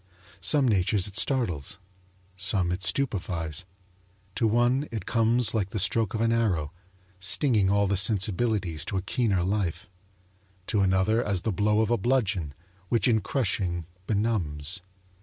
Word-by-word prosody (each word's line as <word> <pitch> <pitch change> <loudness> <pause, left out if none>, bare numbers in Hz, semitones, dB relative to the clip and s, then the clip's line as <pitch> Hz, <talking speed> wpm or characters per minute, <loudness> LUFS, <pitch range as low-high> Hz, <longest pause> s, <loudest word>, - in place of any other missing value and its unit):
Some 135 - +3
natures 100 -2 +1
it 100 - -11
startles; 95 - 0 0.6
some 90 -1 +2
it 90 +2 -3
stupefies. 90 - -1 0.7
To 115 - +1
one 120 +6 +1
it 110 -3 -5
comes 115 0 +2
like 100 -4 -1
the 105 - -5
stroke 110 +1 +1
of 110 - -2
an 115 0 +2
arrow, 95 -10 0 0.5
stinging 95 +3 +4
all 100 +1 +2
the 100 0 0
sensibilities 100 -4 +1
to 95 - -3
a 95 - -3
keener 100 -4 0
life; 95 -3 -2 0.8
to 105 - -1
another 95 +5 +2
as 100 -3 -2
the 110 - -1
blow 105 +4 +1
of 110 +1 -1
a 120 - +1
bludgeon, 95 - -1 0.3
which 115 - +1
in 110 -3 +2
crushing 95 - -2 0.2
benumbs. 100 -7 -1
100 Hz, 145 wpm, -26 LUFS, 90-115 Hz, 0.8 s, stinging